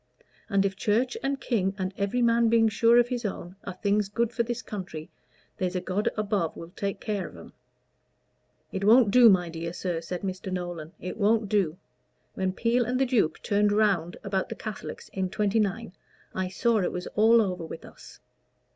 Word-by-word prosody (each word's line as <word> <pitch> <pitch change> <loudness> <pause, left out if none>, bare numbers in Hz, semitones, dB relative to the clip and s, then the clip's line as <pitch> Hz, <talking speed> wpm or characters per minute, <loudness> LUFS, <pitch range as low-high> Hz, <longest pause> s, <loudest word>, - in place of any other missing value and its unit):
And 200 -2 +2
if 195 -1 -1
Church 230 +5 +1
and 275 0 -1
King, 195 -7 0
and 190 0 -3
every 205 +5 0
man 230 0 +4
being 225 -1 +4
sure 230 +2 +4
of 240 0 +4
his 245 -2 -2
own, 185 -3 -5
are 190 - -4
things 200 +1 0
good 235 +2 -1
for 235 - 0
this 235 0 -3
country, 180 -6 -7 0.5
there's 185 0 -2
a - - +1
God 190 +3 -1
above 200 -6 -1
will 165 +1 -9
take 200 +1 -4
care 205 -5 -3
of 90 - -13
'em." 85 - -13 1.2
"It 190 - -3
won't 220 +1 +6
do, 245 0 +8
my 180 -3 +3
dear 165 0 -5
sir," 175 -2 -3
said 175 +2 -5
Mr. 190 0 -4
Nolan 175 -3 -5
"It 180 - -6
won't 215 0 +2
do. 185 -6 +1 0.6
When 190 -1 -1
Peel 235 +5 +1
and 250 +2 -1
the 270 - +3
Duke 225 -11 +1
turned 205 0 +2
round 200 -5 +1
about 195 -2 -1
the - - -5
Catholics 215 -3 -7
in 190 -1 -2
'29, 210 0 0 0.4
I 185 0 -1
saw 225 +4 +1
it 180 - 0
was 180 0 -5
all 225 +2 +5
over 185 -5 -1
with 160 - -8
us. - - -14
200 Hz, 190 wpm, -27 LUFS, 185-230 Hz, 1.2 s, do